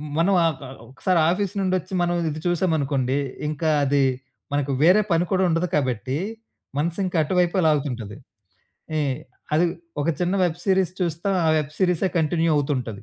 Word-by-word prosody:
మ 150 Hz, -, -7 dB
మనం 185 Hz, +4 st, +3 dB
ఆహ్ 165 Hz, -1 st, +2 dB
గ -, -, -9 dB, 0.3 s
ఒకసారి 175 Hz, +7 st, 0 dB
ఆఫీస్ 190 Hz, +1 st, -1 dB
నుండొచ్చి 185 Hz, -1 st, -1 dB
మనం 175 Hz, 0 st, +1 dB
ఇది 155 Hz, +1 st, -5 dB
చూసామనుకోండి. 145 Hz, -7 st, +1 dB, 0.3 s
ఇంకా 155 Hz, +1 st, -2 dB, 0.2 s
అది 140 Hz, 0 st, +2 dB, 0.5 s
మనకు 145 Hz, -1 st, 0 dB
వేరే 185 Hz, +6 st, +6 dB
పని 165 Hz, +1 st, +3 dB
కూడా 190 Hz, 0 st, +2 dB
ఉండదు 165 Hz, +2 st, +1 dB
కాబట్టి, 130 Hz, -2 st, -1 dB, 0.6 s
మనసింకా 175 Hz, +3 st, -1 dB
అటువైపే‌లాగుతుంటది. 150 Hz, -, 0 dB, 0.8 s
ఈ -, -, +2 dB, 0.5 s
అది 160 Hz, +3 st, +4 dB, 0.4 s
ఒక 145 Hz, -, -1 dB
చిన్న 180 Hz, +2 st, +1 dB
వెబ్ 175 Hz, -1 st, -1 dB
సీరీస్ 190 Hz, -2 st, +2 dB
చూస్తాం. 175 Hz, +3 st, -1 dB
ఆ -, -, +4 dB
వెబ్ 150 Hz, -1 st, -3 dB
సీరీసే 180 Hz, 0 st, +2 dB
కంటిన్యూ 165 Hz, +1 st, +1 dB
అవుతుంటది. 125 Hz, -8 st, -2 dB
165 Hz, 145 wpm, -23 LUFS, 145-180 Hz, 0.8 s, వేరే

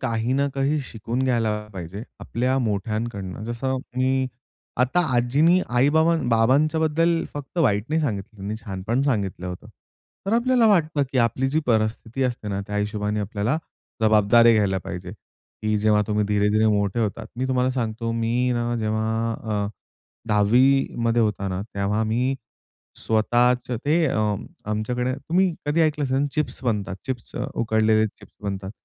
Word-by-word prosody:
काही 115 Hz, -1 st, -1 dB
ना 140 Hz, +1 st, +2 dB
काही 140 Hz, +2 st, +1 dB
शिकून 120 Hz, +3 st, -3 dB
घ्यायला 115 Hz, -4 st, +1 dB, 0.2 s
पाहिजे 95 Hz, +2 st, -7 dB, 0.2 s
आपल्या 125 Hz, +3 st, -1 dB
मोठ्यांकडनं. 105 Hz, -3 st, -3 dB
जसं 120 Hz, +3 st, -2 dB, 0.2 s
मी 130 Hz, +1 st, +2 dB, 0.5 s
आता 130 Hz, +8 st, +3 dB, 0.2 s
आजीनी 145 Hz, +9 st, +4 dB
आई-बाबा 155 Hz, +7 st, +3 dB
बाबांच्याबद्दल 155 Hz, +8 st, +2 dB
फक्त 145 Hz, +4 st, -6 dB
वाईट 105 Hz, -10 st, +2 dB
नाही 160 Hz, +2 st, +1 dB
सांगितलं 110 Hz, -7 st, -3 dB
त्यांनी 100 Hz, +2 st, -4 dB
छानपण 105 Hz, +5 st, -1 dB
सांगितलं 100 Hz, -9 st, -1 dB
होतं. 90 Hz, 0 st, -7 dB, 0.6 s
तर 200 Hz, -, 0 dB
आपल्याला 240 Hz, 0 st, +3 dB
वाटतं 160 Hz, -8 st, +3 dB
की 130 Hz, -, +1 dB
आपली 120 Hz, +2 st, +2 dB
जी 155 Hz, +4 st, +1 dB
परिस्थिती 110 Hz, +2 st, 0 dB
असते 120 Hz, -4 st, -2 dB
ना, 100 Hz, -1 st, -2 dB
त्या 105 Hz, -1 st, -4 dB
हिशोबाने 105 Hz, 0 st, -1 dB
आपल्याला 105 Hz, +7 st, -1 dB, 0.4 s
जबाबदारी 110 Hz, +2 st, +6 dB
घ्यायला 100 Hz, -3 st, +2 dB
पाहिजे. 90 Hz, +1 st, -6 dB, 0.5 s
की 110 Hz, 0 st, +1 dB
जेव्हा 105 Hz, 0 st, +3 dB
तुम्ही 105 Hz, -1 st, +1 dB
धीरे-धीरे 105 Hz, +1 st, +2 dB
मोठे 100 Hz, +1 st, +1 dB
होतात. 105 Hz, -3 st, -2 dB
मी 130 Hz, +2 st, -1 dB
तुम्हाला 130 Hz, 0 st, +2 dB
सांगतो 115 Hz, -2 st, -2 dB
मी 115 Hz, +2 st, 0 dB
ना, 120 Hz, 0 st, -1 dB
जेव्हा 110 Hz, +1 st, -1 dB
अ, 105 Hz, -2 st, -2 dB, 0.6 s
10वी 120 Hz, +6 st, +4 dB
मध्ये 115 Hz, 0 st, +2 dB
होता 105 Hz, -2 st, -1 dB
ना, 95 Hz, 0 st, -3 dB
तेव्हा 100 Hz, +2 st, 0 dB
मी 125 Hz, +5 st, 0 dB, 0.6 s
स्वतःच 120 Hz, +3 st, +2 dB
ते 145 Hz, +8 st, +1 dB
अ, 130 Hz, -, 0 dB, 0.5 s
आमच्याकडे 125 Hz, +4 st, -1 dB
तुम्ही 170 Hz, +6 st, +1 dB
कधी 150 Hz, +3 st, +2 dB
ऐकलं 150 Hz, -2 st, +1 dB
असेल 135 Hz, +2 st, +1 dB
चिप्स 150 Hz, -3 st, -2 dB
बनतात, 105 Hz, -5 st, -1 dB
चिप्स 125 Hz, -4 st, -5 dB, 0.2 s
उकडलेले 110 Hz, -1 st, +2 dB
चिप्स 105 Hz, -, -14 dB
बनतात. 95 Hz, -1 st, -4 dB
115 Hz, 145 wpm, -23 LUFS, 105-135 Hz, 0.6 s, जबाबदारी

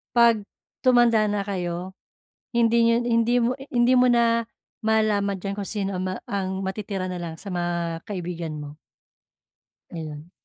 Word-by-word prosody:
pag 230 Hz, -3 st, +5 dB, 0.4 s
tumanda 240 Hz, -3 st, +5 dB
na 205 Hz, -1 st, 0 dB
kayo 185 Hz, -1 st, -4 dB, 0.6 s
hindi 235 Hz, 0 st, +4 dB
nyo 230 Hz, -, +4 dB
hindi 230 Hz, 0 st, +2 dB
mo 240 Hz, +1 st, +2 dB, 0.2 s
hindi 245 Hz, -1 st, +3 dB
mo 250 Hz, 0 st, +5 dB
na 230 Hz, -1 st, +3 dB, 0.4 s
malaman 215 Hz, -3 st, +2 dB
dyan 195 Hz, +2 st, -4 dB
kung 200 Hz, 0 st, -4 dB
sino 195 Hz, -3 st, -2 dB
ang 185 Hz, -, -2 dB, 0.5 s
ma 195 Hz, -, -3 dB
matitira 195 Hz, -3 st, -4 dB
nalang 170 Hz, -3 st, -5 dB
sa 200 Hz, -, -8 dB
mga 170 Hz, -1 st, -2 dB
kaibigan 175 Hz, -5 st, -4 dB
mo. 145 Hz, 0 st, -8 dB, 1.2 s
Ayun. 155 Hz, 0 st, -7 dB
200 Hz, 140 wpm, -24 LUFS, 175-230 Hz, 1.2 s, pag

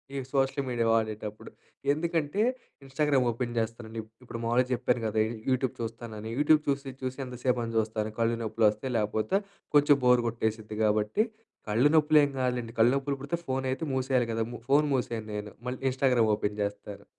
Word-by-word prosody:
ఈ -, -, -2 dB
social 135 Hz, 0 st, +1 dB
media 120 Hz, -2 st, 0 dB
వాడేటప్పుడు. 110 Hz, -1 st, -2 dB, 0.4 s
ఎందుకంటే, 165 Hz, +3 st, 0 dB, 0.4 s
ఇన్‌స్టాగ్రామ్ 135 Hz, -1 st, +1 dB
ఓపెన్ 120 Hz, 0 st, -4 dB
చేస్తానండి. 115 Hz, 0 st, -4 dB
ఇప్ 110 Hz, -, -20 dB
ఇప్పుడు 115 Hz, -1 st, -7 dB
మామూలుగా 120 Hz, +2 st, +2 dB
చెప్పాను 125 Hz, 0 st, 0 dB
గదా! 110 Hz, 0 st, 0 dB
యు -, -, -4 dB, 0.2 s
యూట్యూబ్ 130 Hz, -1 st, +1 dB
చూస్తానని. 115 Hz, -1 st, -6 dB
యూట్యూబ్ 150 Hz, +1 st, +5 dB
చూసి, 140 Hz, -1 st, -1 dB
చూసి 130 Hz, 0 st, -3 dB
ఎంతసేపని 125 Hz, -2 st, -2 dB
చూస్తాను, 110 Hz, 0 st, -1 dB
కళ్ళు 115 Hz, 0 st, +2 dB
నొప్పులు 110 Hz, 0 st, +1 dB
వస్తాయి, 110 Hz, +5 st, -4 dB
లేపోతే 110 Hz, -, +1 dB, 0.4 s
కొంచెం 145 Hz, -1 st, +6 dB
బోర్ 125 Hz, -1 st, +6 dB
కొట్టేసిద్ది 110 Hz, -1 st, -3 dB
కాబట్టి 105 Hz, -, +2 dB, 0.5 s
కళ్ళు 120 Hz, +7 st, +4 dB
నొప్పులు 155 Hz, 0 st, +5 dB
ఏం 145 Hz, -, +2 dB
కదులేండి, 125 Hz, -2 st, -1 dB
కళ్ళు 120 Hz, +3 st, +6 dB
నొప్పులు 140 Hz, 0 st, -1 dB
పుడితే 145 Hz, +5 st, -2 dB
ఫోన్ 130 Hz, 0 st, -1 dB
అయితే 135 Hz, -, -3 dB
మూసేయాలి 130 Hz, -2 st, +1 dB
గదా! 115 Hz, 0 st, 0 dB
ము 120 Hz, -, -7 dB
ఫోన్ 145 Hz, +2 st, +4 dB
మూసేయను 115 Hz, -4 st, -3 dB
నేను, 105 Hz, 0 st, -5 dB, 0.2 s
మళ్ళీ 125 Hz, +1 st, -4 dB
ఇన్‌స్టాగ్రామ్ 125 Hz, -4 st, +2 dB
ఓపెన్ 105 Hz, 0 st, -3 dB
చేస్తాను. 100 Hz, 0 st, -6 dB
120 Hz, 170 wpm, -28 LUFS, 110-135 Hz, 0.5 s, కొంచెం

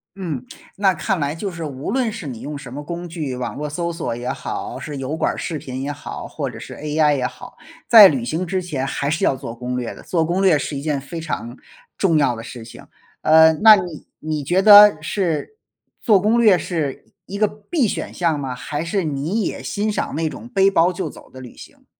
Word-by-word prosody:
嗯， 165 Hz, -10 st, -4 dB, 0.3 s
那 195 Hz, -1 st, +3 dB
看 190 Hz, +3 st, -2 dB
来 145 Hz, +1 st, -1 dB
就 195 Hz, +4 st, -4 dB
是 170 Hz, -2 st, -7 dB
无 140 Hz, +2 st, -5 dB
论 250 Hz, -2 st, 0 dB
是 210 Hz, -7 st, -8 dB
你 120 Hz, -4 st, -7 dB
用 145 Hz, 0 st, -6 dB
什 135 Hz, -3 st, -10 dB
么 145 Hz, +1 st, -6 dB
工 175 Hz, +2 st, -6 dB
具， 155 Hz, -6 st, -4 dB
网 125 Hz, -, -4 dB
络 150 Hz, +1 st, -4 dB
搜 170 Hz, +3 st, -3 dB
索 165 Hz, -8 st, -3 dB
也 120 Hz, +1 st, -6 dB
好， -, -, -5 dB
是 145 Hz, -2 st, -6 dB
油 135 Hz, +3 st, -3 dB
管 -, -, 0 dB
儿 -, -, -9 dB
视 160 Hz, -, -4 dB
频 130 Hz, -2 st, -6 dB
也 145 Hz, -, -3 dB
好， 145 Hz, 0 st, -7 dB
或 -, -, -4 dB
者 -, -, -10 dB
是 -, -, -9 dB
AI 150 Hz, 0 st, +1 dB
也 125 Hz, -, -1 dB
好， 250 Hz, -, -12 dB, 0.3 s
在 220 Hz, -5 st, +10 dB
旅 130 Hz, -7 st, -1 dB
行 165 Hz, +7 st, -2 dB
之 185 Hz, +1 st, -2 dB
前 145 Hz, -7 st, -3 dB
还 140 Hz, +1 st, -2 dB
是 155 Hz, -, -1 dB
要 135 Hz, -, +3 dB
做 130 Hz, -3 st, -7 dB
攻 125 Hz, +1 st, -4 dB
略 125 Hz, -2 st, -4 dB
的， -, -, -13 dB
做 165 Hz, -3 st, 0 dB
攻 175 Hz, +4 st, 0 dB
略 185 Hz, -6 st, +5 dB
是 145 Hz, -, -4 dB
一 140 Hz, -, -4 dB
件 145 Hz, -2 st, -1 dB
非 160 Hz, +5 st, -7 dB
常 120 Hz, -7 st, -5 dB, 0.4 s
重 170 Hz, -5 st, +2 dB
要 135 Hz, -5 st, +2 dB
的 115 Hz, -, -7 dB
事 115 Hz, -1 st, -9 dB
情。 115 Hz, -, -13 dB, 0.4 s
呃， 160 Hz, +1 st, +6 dB
那 215 Hz, +7 st, +8 dB
你 180 Hz, -6 st, -6 dB
你 155 Hz, -1 st, -3 dB
觉 180 Hz, +7 st, +2 dB
得 205 Hz, -4 st, +9 dB
是 175 Hz, -, -2 dB, 0.4 s
做 210 Hz, -5 st, +4 dB
攻 215 Hz, +5 st, +2 dB
略 210 Hz, -6 st, +6 dB
是 155 Hz, -7 st, -3 dB, 0.2 s
一 200 Hz, -, -6 dB
个 215 Hz, 0 st, +3 dB
必 225 Hz, +6 st, -2 dB
选 -, -, -4 dB
项 165 Hz, -4 st, 0 dB
吗？ 130 Hz, -3 st, -4 dB
还 145 Hz, +5 st, -4 dB
是 185 Hz, +3 st, -1 dB
你 155 Hz, +8 st, -2 dB
也 -, -, -4 dB
欣 210 Hz, +1 st, -2 dB
赏 205 Hz, -, -3 dB
那 160 Hz, +1 st, -1 dB
种 230 Hz, +9 st, -8 dB
背 195 Hz, -3 st, +3 dB
包 175 Hz, 0 st, +3 dB
就 185 Hz, +1 st, -4 dB
走 -, -, -14 dB
的 130 Hz, -, -12 dB
旅 125 Hz, -2 st, -11 dB
行。 -, -, -15 dB
160 Hz, 255 characters per minute, -20 LUFS, 140-190 Hz, 0.4 s, 在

